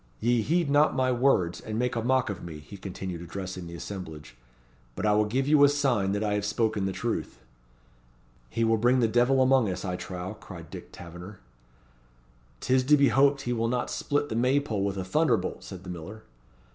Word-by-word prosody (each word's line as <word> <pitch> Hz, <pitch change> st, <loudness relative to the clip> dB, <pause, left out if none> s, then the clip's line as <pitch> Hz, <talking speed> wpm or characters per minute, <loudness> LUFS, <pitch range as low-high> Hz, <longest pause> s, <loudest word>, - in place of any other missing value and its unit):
Ye 120 Hz, +1 st, +2 dB
heed 170 Hz, +7 st, +1 dB
not 145 Hz, +2 st, +4 dB
my 130 Hz, -1 st, +2 dB
words, 120 Hz, -9 st, +2 dB
and 110 Hz, 0 st, -5 dB
make 125 Hz, +1 st, 0 dB
a 115 Hz, -, 0 dB
mock 130 Hz, -1 st, +1 dB
of 100 Hz, -, -7 dB
me," 80 Hz, -3 st, -7 dB
he 75 Hz, +7 st, -12 dB
continued, 95 Hz, -2 st, -6 dB
addressing 90 Hz, 0 st, -6 dB
the 85 Hz, -, -8 dB
assemblage: 80 Hz, -8 st, -8 dB, 0.6 s
"but -, -, -3 dB
I 105 Hz, -, +4 dB
will 105 Hz, +1 st, +3 dB
give 130 Hz, +6 st, -1 dB
you 150 Hz, -1 st, +5 dB
a 145 Hz, -, +8 dB
sign 130 Hz, -9 st, +1 dB
that 105 Hz, +1 st, -1 dB
I 105 Hz, -1 st, 0 dB
have 105 Hz, 0 st, -1 dB
spoken 105 Hz, -1 st, 0 dB
the 95 Hz, -, -1 dB
truth." -, -, -3 dB, 1.1 s
"He 115 Hz, -, -1 dB
will 115 Hz, 0 st, +3 dB
bring 120 Hz, +3 st, +3 dB
the 115 Hz, -, +3 dB
devil 125 Hz, +4 st, +3 dB
among 130 Hz, -4 st, +3 dB
us, 95 Hz, -, -4 dB
I 90 Hz, -1 st, -2 dB
trow," 90 Hz, +2 st, -6 dB
cried 95 Hz, -6 st, -11 dB
Dick -, -, -9 dB
Taverner. 90 Hz, +4 st, -10 dB, 1.2 s
"'Tis 130 Hz, 0 st, +2 dB
to 150 Hz, +2 st, +6 dB
be 140 Hz, -2 st, +4 dB
hoped 140 Hz, +3 st, +3 dB
he 120 Hz, -2 st, -2 dB
will 115 Hz, -1 st, 0 dB
not 125 Hz, 0 st, -1 dB
split 145 Hz, 0 st, -1 dB
the -, -, -3 dB
May 130 Hz, +4 st, +3 dB
pole 110 Hz, -9 st, -2 dB
with 100 Hz, -1 st, -2 dB
a 95 Hz, -, -3 dB
thunderbolt," 95 Hz, -, 0 dB
said 95 Hz, -1 st, -9 dB
the 90 Hz, -, -9 dB
miller. 95 Hz, +6 st, -8 dB
110 Hz, 210 wpm, -27 LUFS, 95-130 Hz, 1.2 s, a